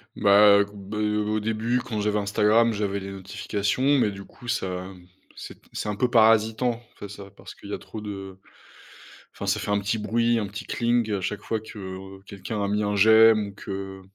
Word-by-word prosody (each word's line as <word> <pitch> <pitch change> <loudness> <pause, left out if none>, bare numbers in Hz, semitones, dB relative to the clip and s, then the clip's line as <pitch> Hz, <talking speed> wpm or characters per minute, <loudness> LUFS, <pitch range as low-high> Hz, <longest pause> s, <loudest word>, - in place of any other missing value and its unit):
Bah, 100 0 +6
heu, 100 - +3
b 100 0 -10
heu, 105 0 0
au 110 0 0
début, 110 +3 -1
quand 115 -4 -4
j'avais 105 0 0
Instagram, 105 +3 +3
j'avais 100 -2 -2
les 100 0 -7
notifications 100 +7 -1
mais 105 -5 +2
du 100 0 -9
coup, 125 - -15
ça, 95 -6 -2 0.5
c'est - - -10 0.2
c'est 105 - -3
un 105 - -2
peu 125 - +1
parasitant, 115 +1 +3
enfin, 100 - -9
ça 100 -1 -11
parce - - -12
qu'il - - -11
y - - -3
a - - -3
trop 110 - -9
de 95 -2 -7 1.0
enfin, - - -7
ça - - +1
fait 105 - -3
un 100 - +2
petit 105 +3 -1
bruit, 115 +2 +1
un 105 - -2
petit 100 +1 -8
cling 120 -2 0
à 100 - 0
chaque 105 +2 -3
fois 110 - -2
que 95 -2 -9
quelqu'un 100 +2 -5
a 100 - 0
mis 105 +1 0
un 105 0 -1
j'aime 110 0 +6
ou - - -12
que 95 -1 -7
105 Hz, 210 wpm, -25 LUFS, 100-110 Hz, 1.0 s, Bah